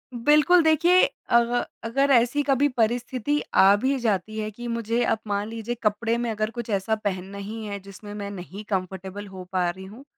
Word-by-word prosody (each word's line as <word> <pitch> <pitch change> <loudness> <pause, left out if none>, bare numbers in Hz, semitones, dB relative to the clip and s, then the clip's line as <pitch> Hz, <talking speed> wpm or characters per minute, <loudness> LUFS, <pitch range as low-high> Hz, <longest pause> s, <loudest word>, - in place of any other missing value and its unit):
बिल्कुल 300 +8 +5
देखिए 340 +4 +5 0.3
अग 235 0 +4 0.4
अगर 275 +5 +1
ऐसी 245 +4 +4
कभी 280 +1 +3
परिस्थिति 245 +5 0 0.2
आ 200 +1 +7
भी 270 +1 +1
जाती 215 -1 -1
है 215 0 -2
कि 240 +3 -8
मुझे 230 +1 -1
अब 220 - +1
मान 205 +1 -1
लीजिए 230 +1 -4
कपड़े 225 +2 +1
में 240 -1 -2
अगर 215 0 -1
कुछ 240 -1 -6
ऐसा 205 +2 0
पहनना 195 -2 -4
ही 215 +3 -6
है 200 -1 -5
जिसमें 200 +2 -11
मैं 200 -1 -5
नहीं 195 +2 -8
कंफ़र्टेबल 190 +1 -4
हो 190 -1 -9
पा 180 -2 +1
रही 190 +2 -7
हूँ, 220 +8 -12
220 Hz, 190 wpm, -25 LUFS, 200-240 Hz, 0.4 s, आ